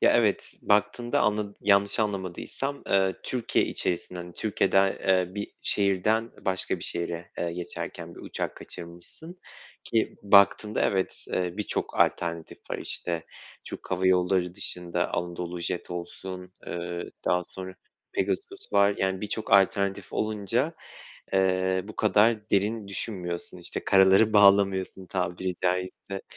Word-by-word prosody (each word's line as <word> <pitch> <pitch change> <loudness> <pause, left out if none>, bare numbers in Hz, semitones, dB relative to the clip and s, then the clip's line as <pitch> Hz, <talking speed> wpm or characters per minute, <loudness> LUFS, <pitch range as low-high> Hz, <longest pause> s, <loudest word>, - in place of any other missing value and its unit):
ya, - - +6
evet, - - +1
baktığında 105 +4 +2
anladı 105 -1 0
yanlış 100 +1 +3
anlamadıysam, 105 +7 -3
eee, 95 -1 +3
Türkiye 125 -3 0
içerisinden, 90 0 -3
hani, 90 0 -9
Türkiye'de, 95 -1 +2
eee, 95 -1 +3
bir 105 0 -4
şehirden, 100 +2 +2
ı 115 - -17
başka 95 -1 -1
bir - - -7
şehire, 85 0 -4
eee, 85 -1 -1
geçerken 85 0 -6
bir - - -11
uçak - - -4
kaçırmışsın 85 - -10 0.4
ki, 115 -1 0
baktığında, 100 +1 +5
evet, 95 -1 0
eee, 90 -1 0
birçok 105 - -3
alternatif 85 -1 0
var. - - -2
İşte, 85 -2 -2 0.4
Türk - - -9
Hava 95 0 +1
Yolları 90 -1 +2
dışında 90 -3 -2
Anadolu 85 0 -3
Jet 85 +1 -3
olsun, 90 +1 -7
ııı, 85 0 -4
daha 90 0 +2
sonra 95 +1 -8 0.4
Pegasus 395 -1 -3
var, 100 0 +5
yani, 95 0 0
birçok 105 0 -4
alternatif 100 0 +3
olunca, 110 - 0 0.6
eee, 95 -1 +2
bu 105 +1 -10
kadar 105 +1 +3
derin 105 +1 +1
düşünmüyorsun, 90 -3 -4
işte, 85 - -2
karaları 95 +3 +6
bağlamıyorsun, 100 -2 +4
tabiri 90 0 -2
caizse. 90 +2 -2
95 Hz, 130 wpm, -27 LUFS, 90-105 Hz, 0.6 s, ya